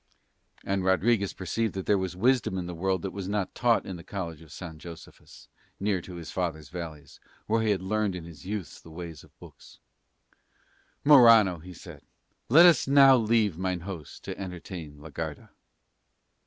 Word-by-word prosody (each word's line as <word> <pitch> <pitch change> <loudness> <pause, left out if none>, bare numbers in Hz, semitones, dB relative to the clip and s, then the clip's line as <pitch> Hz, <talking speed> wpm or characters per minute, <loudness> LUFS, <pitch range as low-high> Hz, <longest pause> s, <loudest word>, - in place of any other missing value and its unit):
And 95 -1 -1
Rodriguez 100 +2 +2
perceived 110 +4 -3
that 95 - -4
there 105 - +3
was 95 -1 -3
wisdom 120 -1 +1
in 90 - -3
the 90 - -6
world 95 +1 -1
that 95 - -3
was 100 -1 -5
not 100 -2 -2
taught 120 -2 +2
in 95 - -6
the 85 - -11
College 85 -4 -6
of 80 -2 -15
San 80 -3 -9
Josephus, 85 0 -13 0.3
near 100 -2 0
to 90 +1 -10
his 85 -1 -8
father's 80 -5 -3
valleys, 80 -4 -8 0.3
where 115 +1 +1
he 110 - 0
had 95 -3 0
learned 105 0 -1
in 90 - -6
his 80 -4 -12
youth 95 -5 -6
the - - -15
ways 80 -1 -8
of - - -22
books. - - -15 1.3
"Morano," 115 - +7
he 90 +2 -11
said, - - -12 0.5
"let 160 +8 +8
us 170 -7 +5
now 135 -1 +7
leave 110 -6 +1
mine 95 -2 -2
host 90 -5 -8
to - - -5
entertain 90 -5 -7
la 75 +2 -11
Garda." - - -6
95 Hz, 180 wpm, -27 LUFS, 85-105 Hz, 1.3 s, let